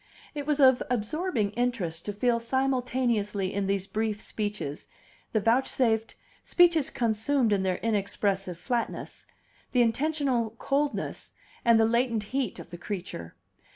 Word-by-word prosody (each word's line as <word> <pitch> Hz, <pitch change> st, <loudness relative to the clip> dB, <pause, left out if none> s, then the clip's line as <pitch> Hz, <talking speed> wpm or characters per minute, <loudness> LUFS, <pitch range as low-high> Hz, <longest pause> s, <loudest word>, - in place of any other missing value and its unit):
It 290 Hz, -1 st, -5 dB
was 300 Hz, -1 st, +1 dB
of 260 Hz, -2 st, +6 dB
absorbing 250 Hz, -, -1 dB
interest 210 Hz, -9 st, -2 dB
to -, -, 0 dB
feel 235 Hz, +3 st, +1 dB
simultaneously 240 Hz, -6 st, 0 dB
in 200 Hz, -1 st, -1 dB
these 195 Hz, -1 st, 0 dB
brief 215 Hz, 0 st, -2 dB
speeches 205 Hz, -10 st, -4 dB, 0.4 s
he -, -, 0 dB
vouchsafed 225 Hz, 0 st, +2 dB, 0.3 s
speeches 340 Hz, -5 st, +4 dB
consummate 235 Hz, 0 st, +1 dB
in 195 Hz, -, +2 dB
their 185 Hz, -1 st, 0 dB
inexpressive 200 Hz, -4 st, -1 dB
flatness 230 Hz, +7 st, -3 dB, 0.5 s
the 250 Hz, -2 st, +5 dB
intentional 255 Hz, -2 st, 0 dB
coldness 285 Hz, +3 st, -2 dB, 0.3 s
and 235 Hz, -2 st, +5 dB
the 225 Hz, -, +5 dB
latent 235 Hz, -1 st, +1 dB
heat 265 Hz, -7 st, -1 dB
of 170 Hz, -, -10 dB
the 175 Hz, -, -8 dB
creature. 175 Hz, -, -6 dB
230 Hz, 130 wpm, -28 LUFS, 205-260 Hz, 0.5 s, of